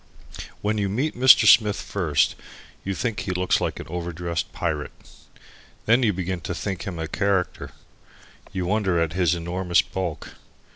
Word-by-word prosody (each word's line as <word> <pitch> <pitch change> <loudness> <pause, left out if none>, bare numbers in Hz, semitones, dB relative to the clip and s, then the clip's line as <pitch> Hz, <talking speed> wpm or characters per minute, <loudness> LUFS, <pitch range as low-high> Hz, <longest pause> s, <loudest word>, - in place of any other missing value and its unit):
When 105 +1 0
you 100 -1 0
meet 130 +10 -1
Mr. 130 +1 +7
Smith 105 -3 +6
first 80 -8 0 0.5
you 95 0 -3
think 115 -1 -2
he - - -5
looks 90 0 +1
like - - -2
an - - -7
over 85 +1 -4
dressed 85 0 -4
pirate. 75 -4 -3 0.9
Then 115 +4 +4
you 115 -4 +3
begin 90 -1 -3
to 90 - -4
think 95 +1 -4
him 90 -3 -5
a 80 -1 -3
character. 100 0 -1 0.8
You 90 -1 -3
wonder 95 -2 +1
at 80 -1 0
his 90 -2 +2
enormous 85 +1 +1
bulk. 90 -4 -5
90 Hz, 160 wpm, -24 LUFS, 85-105 Hz, 0.9 s, Mr